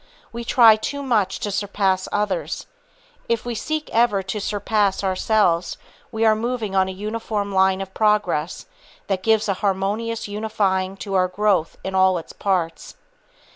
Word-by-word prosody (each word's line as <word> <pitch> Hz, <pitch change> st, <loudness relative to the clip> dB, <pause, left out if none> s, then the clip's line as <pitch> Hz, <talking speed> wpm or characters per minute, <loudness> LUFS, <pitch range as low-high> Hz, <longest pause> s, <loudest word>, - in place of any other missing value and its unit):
We 235 Hz, 0 st, -6 dB
try 230 Hz, -2 st, +6 dB
too 280 Hz, +6 st, -4 dB
much 215 Hz, -8 st, +1 dB
to 205 Hz, -, -2 dB
surpass 195 Hz, -2 st, 0 dB
others. 210 Hz, -, -2 dB, 0.6 s
If 230 Hz, 0 st, 0 dB
we 240 Hz, -, -3 dB
seek 310 Hz, +6 st, -3 dB
ever 225 Hz, -4 st, +2 dB
to 195 Hz, +2 st, -4 dB
surpass 205 Hz, -1 st, 0 dB
ourselves, 185 Hz, -2 st, +1 dB, 0.3 s
we 225 Hz, -1 st, 0 dB
are 220 Hz, -, +6 dB
moving 225 Hz, -3 st, -3 dB
on 190 Hz, 0 st, +3 dB
a -, -, -4 dB
uniform 210 Hz, +1 st, -3 dB
line 190 Hz, 0 st, +3 dB
of 190 Hz, 0 st, -7 dB
progress, 205 Hz, -7 st, 0 dB, 0.4 s
that 195 Hz, -2 st, -1 dB
gives 220 Hz, +1 st, +2 dB
a 200 Hz, -, +2 dB
harmonious 210 Hz, +4 st, -1 dB
unifying 200 Hz, -3 st, -1 dB
to 195 Hz, -, -5 dB
our 185 Hz, -1 st, +3 dB
growth 185 Hz, -3 st, 0 dB
in 190 Hz, -, -4 dB
all 190 Hz, -1 st, +4 dB
its 165 Hz, -, -8 dB
parts. 180 Hz, -5 st, -2 dB
205 Hz, 155 wpm, -22 LUFS, 190-220 Hz, 0.6 s, try